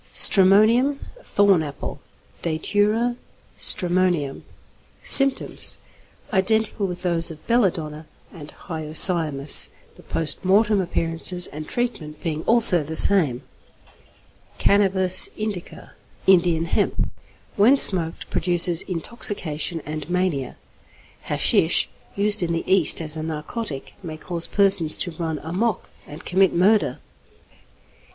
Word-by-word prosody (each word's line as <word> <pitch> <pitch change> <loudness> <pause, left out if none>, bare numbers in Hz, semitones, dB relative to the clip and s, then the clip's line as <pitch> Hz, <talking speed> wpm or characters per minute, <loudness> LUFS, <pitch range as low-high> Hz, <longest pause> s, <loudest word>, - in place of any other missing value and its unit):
_ - - -22
=Stramonium= 215 +8 +4 0.2
(Thorn 200 - +1
Apple). 145 -2 -8 0.4
Datura 210 +8 -2 0.4
stramonium. 175 -6 0 0.6
Symptoms. 275 -1 +5 0.6
Identical 215 +1 0
with 180 0 -9
those 170 -2 +1
of 155 -2 -13
belladonna 160 -10 -2 0.3
and 150 -4 -12 0.2
hyoscyamus, 155 -3 +3 0.2
the - - -18
post 165 +2 -4
mortem 205 +2 +1
appearances 175 +1 -1
and 155 +1 -10
treatment 165 -12 -5
being 155 -2 -5
also 225 -7 +6
the 155 +2 -8
same. 155 -11 +2 1.1
=Cannabis 190 -2 +2
Indica= 210 -5 -8 0.3
(Indian 175 -3 +2
Hemp). 170 - -3 0.4
When 235 +8 +3
smoked, 170 -9 +2
produces 175 0 +2
intoxication 170 -4 -2
and 155 0 -8
mania. 175 -7 -3 0.7
Hashish, - - +2 0.3
used 210 +1 -1
in 170 -1 -2
the 165 - -4
East 185 -3 +2
as 155 0 -4
a 160 - -6
narcotic, 155 - -7
may 160 -4 -9
cause 170 +1 -6
persons 195 -6 +3
to 175 - -3
run 160 -1 -5
'amok' 190 +6 -4 0.2
and 150 - -12
commit 190 0 0
murder. 205 +5 +1 0.6
XXXI. - - -34
175 Hz, 110 wpm, -21 LUFS, 160-200 Hz, 1.1 s, also